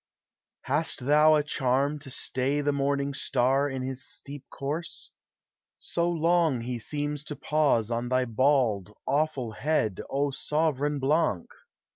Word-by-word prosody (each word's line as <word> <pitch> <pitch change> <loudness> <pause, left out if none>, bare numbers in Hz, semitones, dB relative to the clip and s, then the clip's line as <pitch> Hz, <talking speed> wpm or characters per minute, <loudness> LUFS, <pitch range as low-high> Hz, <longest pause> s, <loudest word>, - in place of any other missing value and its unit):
Hast 145 -2 -1
thou 150 +2 +6
a 150 - +2
charm 140 +1 0
to 145 -2 -9
stay 135 +2 -1
the 145 0 +1
morning 140 0 0
star 135 +2 +1
In 135 -1 -4
his 130 0 -4
steep 140 -1 -7
course? 150 +5 -5 0.7
So 170 0 -1
long 165 -5 +2
he 120 0 -4
seems 145 +3 -3
to 150 - -5
pause 140 -7 +1
On 120 +1 -1
thy 130 0 +2
bald, 115 -5 +1
awful 140 -5 0
head, 110 - 0
O 140 +1 0
sovran 150 0 0
Blanc! 140 - +1
140 Hz, 135 wpm, -27 LUFS, 130-150 Hz, 0.7 s, thou